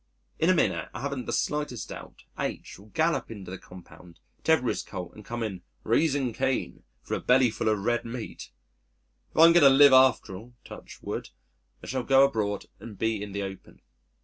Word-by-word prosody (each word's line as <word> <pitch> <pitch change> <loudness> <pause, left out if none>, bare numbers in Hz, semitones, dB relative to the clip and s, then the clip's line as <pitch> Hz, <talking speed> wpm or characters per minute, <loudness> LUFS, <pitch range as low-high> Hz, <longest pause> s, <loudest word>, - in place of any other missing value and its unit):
In 165 - +3
a 185 - +5
minute - - 0
I - - -5
haven't 140 -2 -4
the - - -2
slightest 150 -6 -2
doubt, - - -10 0.2
H - - -5
will 100 - -16
gallop 160 +9 0
into 100 -5 -9
the 95 - -7
compound, 90 -1 -15 0.2
tether 160 -6 +3
his - - -1
colt 90 -3 -8
and 105 - -13
come 120 +2 -5
in 95 -5 -5 0.2
"raising 135 0 +1
Cain" 130 +3 -2 0.2
for - - -6
a - - 0
belly 125 -1 +3
full 110 - -1
of 110 - +2
red 120 +4 -1
meat.... 115 0 -7 0.8
If - - -17
I 160 - +9
am 170 - +7
going 175 - +6
to 140 - +9
live 140 0 +7
after 130 -7 +4
all 120 +6 -12
(touch - - -12
wood) - - -5 0.5
I - - -8
shall 130 0 -2
go 135 +2 +5
abroad 105 -6 -2
and 110 -4 -10
be 110 -1 -1
in 105 0 -6
the 100 +1 -3
open. 95 -1 -9
120 Hz, 200 wpm, -27 LUFS, 100-135 Hz, 0.8 s, I